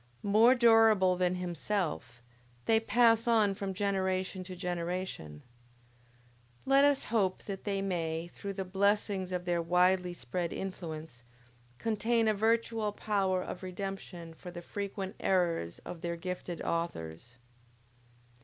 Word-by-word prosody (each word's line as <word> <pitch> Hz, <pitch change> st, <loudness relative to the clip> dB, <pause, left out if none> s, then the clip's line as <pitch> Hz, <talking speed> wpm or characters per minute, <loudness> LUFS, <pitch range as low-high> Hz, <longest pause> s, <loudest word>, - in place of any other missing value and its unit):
More 220 Hz, +5 st, +6 dB
durable 225 Hz, -6 st, +5 dB
than 180 Hz, 0 st, +1 dB
himself, 175 Hz, -, -3 dB, 0.4 s
they 225 Hz, 0 st, +4 dB
pass 230 Hz, +1 st, +4 dB
on 220 Hz, -4 st, +4 dB
from 195 Hz, -1 st, -4 dB
generation 190 Hz, -1 st, -1 dB
to 185 Hz, 0 st, -7 dB
generation; 175 Hz, -, -4 dB, 1.2 s
let 275 Hz, +1 st, +5 dB
us 285 Hz, -1 st, +4 dB
hope 195 Hz, -5 st, +1 dB
that 195 Hz, -2 st, -6 dB
they 195 Hz, -1 st, -1 dB
may, 165 Hz, -3 st, -2 dB
through 200 Hz, 0 st, -5 dB
the 190 Hz, 0 st, -4 dB
blessings 195 Hz, 0 st, +1 dB
of 180 Hz, -1 st, -3 dB
their 175 Hz, -1 st, +1 dB
widely 180 Hz, +1 st, +2 dB
spread 170 Hz, +6 st, -3 dB
influence, 160 Hz, -8 st, -6 dB, 0.6 s
contain 225 Hz, -, +1 dB
a 215 Hz, -, +4 dB
virtual 225 Hz, 0 st, +1 dB
power 195 Hz, -3 st, 0 dB
of 180 Hz, -, -7 dB
redemption 185 Hz, -3 st, -6 dB
for 180 Hz, +2 st, -10 dB
the 175 Hz, 0 st, -8 dB
frequent 200 Hz, +1 st, -5 dB
errors 170 Hz, -, +1 dB
of 170 Hz, -, -7 dB
their 170 Hz, 0 st, -2 dB
gifted 180 Hz, 0 st, -5 dB
authors. 120 Hz, -, -4 dB
185 Hz, 125 wpm, -31 LUFS, 175-205 Hz, 1.2 s, More